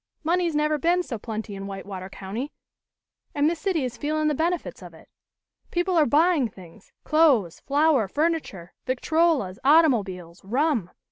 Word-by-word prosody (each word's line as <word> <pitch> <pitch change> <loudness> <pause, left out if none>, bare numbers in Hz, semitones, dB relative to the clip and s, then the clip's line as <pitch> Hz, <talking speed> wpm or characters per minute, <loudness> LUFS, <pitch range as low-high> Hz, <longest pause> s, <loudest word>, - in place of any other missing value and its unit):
Money's 340 0 +1
never 300 0 +1
been 350 +4 +2
so 240 -9 -6
plenty 215 -1 -6
in 195 0 -6
Whitewater 195 -1 -7
County 210 +9 -6 0.8
and 290 +1 +3
this 330 0 -1
city 345 -5 0
is 240 -1 -6
feelin' 305 +1 0
the - - +1
benefits 335 +4 -2
of - - -11
it. - - -17 0.6
People 355 +1 0
are 315 -3 +4
buying 305 0 +3
things 185 -2 -16
clothes, 280 - +3
flour, 285 -5 +2
furniture, 290 - -2
victrolas, 265 - +1
automobiles, 210 - +2
rum. 245 - 0
285 Hz, 145 wpm, -25 LUFS, 200-320 Hz, 0.8 s, are